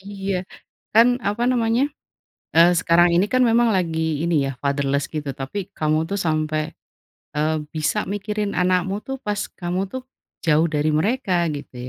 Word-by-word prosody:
Iya, 195 -1 -4 0.6
kan 230 +2 +7 0.2
apa 215 +4 -1
namanya, 235 0 +2 0.7
eee, 170 +1 +7
sekarang 175 +1 +4
ini 190 - +3
kan 255 0 +4
memang 235 +1 +4
lagi 160 -3 -1
ini 155 -5 +1
ya, 135 - -2
fatherless 140 0 0
gitu, 150 -2 -3
tapi 135 +8 -5 0.2
kamu 155 0 +2
tuh 200 - -1
sampai, 155 -1 0 0.7
eee, 155 +1 +1 0.2
bisa 155 +7 0
mikirin 205 0 -2
anakmu 185 +1 +1
tuh, 270 0 -3
pas 210 -1 -1 0.2
kamu 175 +1 -1
tuh 260 - -4 0.4
jauh 160 +1 +4
dari 150 +1 +2
mereka 205 - 0 0.2
gitu 140 - -10
175 Hz, 150 wpm, -22 LUFS, 155-205 Hz, 0.7 s, kan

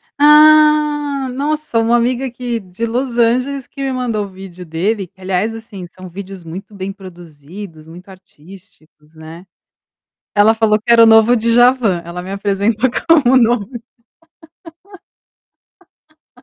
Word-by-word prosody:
Ah 300 -2 +4
Nossa, 295 -2 -2
uma 225 +1 +2
amiga 245 +2 -1
aqui, 245 -1 -5
de 190 +3 -6
Los 240 +1 -3
Angeles, 250 +3 0
que 275 - -10
me 270 - -2
mandou 240 -5 -3
o - - -11
vídeo 185 -1 -12
dele, 180 +4 -3
aliás 190 +3 -2
assim 225 -5 -10
são 185 +1 -13
vídeos 190 0 -10
muito 180 +6 -10
bem 195 -1 -6
produzidos, 170 -2 -12
muito 175 +3 -14
artísticos, 165 -4 -19
né. 160 +3 -12 0.9
Ela 210 +2 +4
falou 220 -1 +1
que 235 - -1
era 230 -1 +7
o - - +7
novo 225 +2 +5
de 230 0 0
Djavan, 240 -6 +3
ela 170 +1 -7
me 190 - -8
apresentou 205 +4 -1 0.2
como 300 -7 +4
o - - +7
novo 235 -3 +2 2.6
Dja - - -27
220 Hz, 145 wpm, -16 LUFS, 185-250 Hz, 2.6 s, era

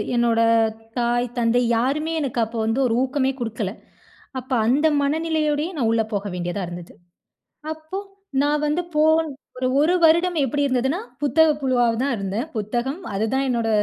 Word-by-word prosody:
என்னோட 235 -1 +2 0.6
தாய் 240 +1 +1
தந்தை 235 +1 +2 0.2
யாருமே 300 +7 0
எனக்கு 255 -4 -2
அப்போ 230 +1 -8
வந்து 225 +4 0
ஒரு 230 - 0
ஊக்கமே 265 0 0
குடுக்கல. 220 -4 -3 0.7
அப்ப 260 +2 -14 0.2
அந்த 285 +6 +3
மனநிலையோடயே 310 +2 0
நான் 230 -4 +1
உள்ள 225 -1 +2
போக 205 0 -2
வேண்டியதா 175 +2 -3
இருந்தது. 175 0 -9 0.8
அப்போ 315 +5 -7 0.4
நான் 295 +1 +1
வந்து 300 +4 0
போன் 315 +1 +4 0.3
ஒரு 255 - 0
1 325 +4 +3
வருடம் 340 +2 +4
எப்படி 285 +3 -1
இருந்ததுன்னா, 265 +5 0 0.2
புத்தக 320 +2 +4
புழுவா 255 -3 +2
வ 230 - -3
தான் 280 -1 0
இருந்தேன. 200 +2 -2 0.2
புத்தகம் 240 - -2
அதுதான் 225 +7 0
என்னோட 235 -2 0
260 Hz, 150 wpm, -22 LUFS, 230-300 Hz, 0.8 s, போன்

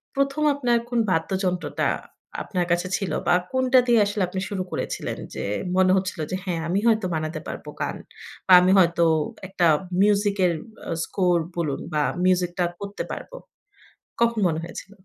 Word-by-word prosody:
১ম 275 +2 0
আপনার 245 -4 +1
কোন 240 -1 0
বাদ্যযন্ত্রটা 180 +2 -1 0.6
আপনার 180 -3 -1
কাছে 175 +1 +1
ছিল? 195 -5 -3 0.2
বা 175 - +5 0.2
কোনটা 260 0 +4
দিয়ে 235 -2 +5
আসলে 205 0 -2
আপনি 185 +1 -4
শুরু 190 -2 -2
করেছিলেন? - - -3 0.2
যে, - - -4 0.3
মনে 185 0 +5
হচ্ছিল 185 -2 -3
যে - - 0
"হ্যাঁ, 175 -3 -2
আমি 180 +4 +1
হয়তো 220 -3 +3
বানাতে 155 0 -3
পারব - - -7 0.2
গান। - - -2 0.5
বা 190 - +7
আমি 180 +1 +4
হয়তো 170 -2 +4 0.4
একটা 185 -2 0 0.4
মিউজিক 205 0 +3
এর 175 - +2 0.4
আ - - -2
স্কোর 180 -3 +1 0.2
বলুন 150 -5 -1
বা 150 - +2 0.2
মিউজিক 180 -1 +2
টা 175 - +3
করতে 200 0 -5
পারবো।" - - -7 0.9
কখন 235 -1 +2
মনে 160 -2 -1
হয়েছিল? 175 +3 -9
185 Hz, 165 wpm, -24 LUFS, 175-210 Hz, 0.9 s, বা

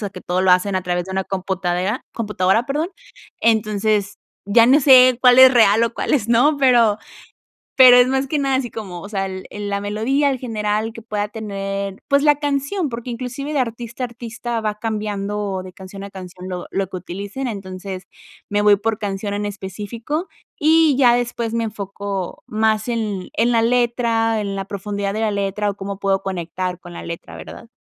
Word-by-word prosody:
sea 205 -3 -4
que 185 - -10
todo 180 +1 -1
lo 190 - +4
hacen 185 +2 +3
a 185 - 0
través 175 -1 -1
de 190 - -7
una 190 0 0
computadora, 190 +2 -2
computadora, 210 0 0
perdón. 300 +5 -1 0.5
Entonces 215 -2 +1 0.3
ya 230 +3 +5
no 280 +4 +5
sé 255 -2 +7
cuál 250 -1 +6
es 260 0 +9
real 225 0 +5
o 230 - -3
cuáles 235 -6 0
no, 255 +6 +4
pero 240 -6 +4 0.8
pero 255 -2 +9
es 245 - +6
más 265 +1 0
que 295 +2 -1
nada 275 -1 +1
así 255 -3 -2
como, 185 -6 -7
o 200 - -9
sea, 195 -2 -2
el 190 0 -7
el 205 0 -5
la 200 0 -2
melodía 250 +8 +1
en 260 - -3
general 215 -2 -2
que 230 - -10
pueda 210 -2 -2
tener, 200 -2 -5
pues 280 +1 +3
la 295 -1 +5
canción, 290 +4 -1
porque 240 +1 -6
inclusive 255 +5 -5
de 285 - +1
artista 235 0 -4
a - - +2
artista 235 0 -5
va 210 -1 -3
cambiando 210 -3 -3
de 185 -1 -11
canción 195 +1 -10
a 200 - -7
canción 185 -1 -10
lo 180 -1 -5
lo 195 -1 -1
que 185 - -6
utilicen. 200 +9 -6
Entonces 185 -3 -7 0.4
me 205 0 +1
voy 205 -1 +6
por 215 +1 -1
canción 200 -1 -3
en 205 - -2
específico, 210 - -5 0.3
y 315 -2 +4
ya 245 -3 +5
después 235 -2 -2
me 230 -1 0
enfoco 200 -2 -5
más 220 0 +1
en 215 -6 -3
en 235 +2 +2
la 230 -1 +3
letra, 230 -2 +1
en 200 -1 -3
la 195 -1 -4
profundidad 200 0 -4
de 215 - -3
la 220 -1 +1
letra, 200 +1 -1
o 200 - -4
cómo 200 0 -6
puedo 195 -1 0
conectar 180 0 -4
con 175 -1 -12
la - - -8
letra, 170 0 -8
¿verdad? 230 - -10
210 Hz, 195 wpm, -20 LUFS, 195-240 Hz, 0.8 s, es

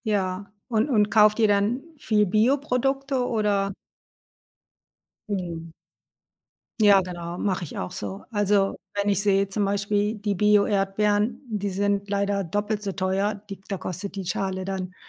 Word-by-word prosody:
Ja. 200 -2 -1 0.2
Und 230 +1 +1
und 210 -5 +3
kauft 210 -1 +5
ihr 220 - +5
dann 205 +5 +2 0.2
viel 210 -5 +2
Bioprodukte 265 +4 +1
oder? 205 -3 +1 1.6
Mhm. 170 -4 -4 1.1
Ja 205 -2 +6
genau, 175 -1 -6
mache 190 -2 -1
ich 160 - -7
auch 90 - -4
so. 100 -2 -5
Also, 205 -2 +2 0.2
wenn 205 0 0
ich 200 -1 +2
sehe 200 -1 +2
zum 205 +1 0
Beispiel 205 +2 0
die 210 -1 -2
Bio-Erdbeeren, 210 +2 +2
die 205 -3 -2
sind 200 +1 -1
leider 200 0 0
doppelt 205 +4 -2
so 200 -2 -2
teuer, 195 +2 0
die 195 - -7
da 195 - -3
kostet 185 +3 -5
die 195 -2 -4
Schale 190 +1 -2
dann, 185 -1 -4
200 Hz, 145 wpm, -25 LUFS, 195-210 Hz, 1.6 s, Ja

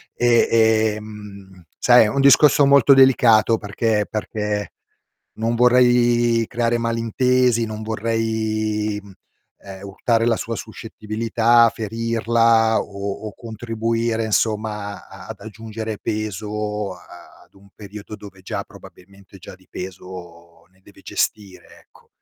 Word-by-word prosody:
E, 120 -1 +3 0.5
ehm, 100 -3 -12
sai, 120 -1 +5
è - - 0
un 140 +6 -1
discorso 140 +1 +5
molto 140 -1 +5
delicato 120 -4 +4
perché 105 0 -1
perché 105 -1 -4 0.6
non 115 +2 -2
vorrei 120 -1 +3
creare 120 0 -1
malintesi, 115 +1 +1
non 110 0 -7
vorrei 110 -1 -2 0.7
ehm, 95 -1 -11
urtare 115 +4 -1
la 115 -2 +1
sua 115 - -5
suscettibilità, 115 +2 0
ferirla 115 0 +1
o 100 +1 -6
o 105 - -9
contribuire 115 0 -3
insomma 105 -1 -2
a - - -13
ad - - -9
aggiungere 110 0 -7
peso 105 -1 -4
a-ad 90 -1 -17
un 100 0 -20
periodo 105 +1 -10
dove 100 -3 -14
già 95 - -5
probabilmente 100 +1 -17
già 90 - -12
di 95 0 -26
peso 85 -2 -10
ne 95 - -30
deve - - -19
gestire, 100 -3 -4
ecco. - - -25
110 Hz, 115 wpm, -20 LUFS, 105-115 Hz, 0.7 s, sai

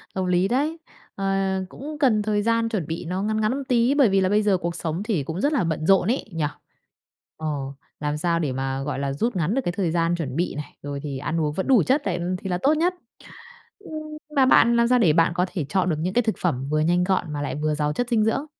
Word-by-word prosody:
Hợp 190 -1 -1
lý 180 +1 +2
đấy, 290 +8 0 0.4
ờ, 195 - -3 0.4
cũng 295 +7 -8
cần 240 -7 +3
thời 210 0 0
gian 230 +1 +1
chuẩn 200 -9 -2
bị 165 +1 -4
nó 180 +3 -2
ngắn 215 +1 0
ngắn 215 - +2
một 280 - -4
tí, 245 0 +3
bởi 275 -6 +5
vì 195 0 +3
là 185 - +2
bây 210 +2 +3
giờ 200 -3 +3
cuộc 170 -1 -3
sống 165 +3 -2
thì 205 - -1
cũng 160 +6 -4
rất 290 +2 +2
là 275 - +2
bận 160 -2 -2
rộn 195 0 +4
ấy, 260 - -2
nhỉ. 160 -2 0 0.9
Ờ, 155 - -6 0.5
làm 150 0 -1
sao 170 +2 0
để 150 -5 -1
mà, 135 +1 -2
gọi 140 0 -3
là, 140 0 -1
rút 225 - -1
ngắn 175 +4 0
được 270 - +2
cái 175 - -1
thời 180 -3 -1
gian 170 +1 +1
chuẩn 150 -6 -4
bị 175 +2 -1
này, 150 +1 -7
rồi 140 -1 -5
thì 140 -3 -4
ăn 165 +4 -2
uống 150 -1 0
vẫn 190 +5 -3
đủ 260 -3 +6
chất 275 +3 +2
đấy 180 -3 -1 0.2
thì 195 - -6
là 180 - 0
tốt 290 +3 +4
nhất. 350 +4 +1 0.9
Ưm, 405 - -13 0.4
mà 270 -2 +5
bạn 235 -2 +5
làm 235 0 +4
sao 250 +1 +4
để 170 -9 +4
bạn 165 +1 +3
có 180 +1 +2
thể 170 -7 -2
chọn 185 +2 +1
được 160 - +1
những 180 +4 -2
cái 245 - +4
thực 220 -2 -1
phẩm 135 -7 -1
vừa 155 +1 +1
nhanh 175 +3 +2
gọn 180 -4 0
mà 145 - -3
lại 145 - -3
vừa 150 +1 -1
giàu 150 0 0
chất 245 +5 -2
dinh 225 -3 +3
dưỡng? 245 +6 0
180 Hz, 270 wpm, -24 LUFS, 155-230 Hz, 0.9 s, đủ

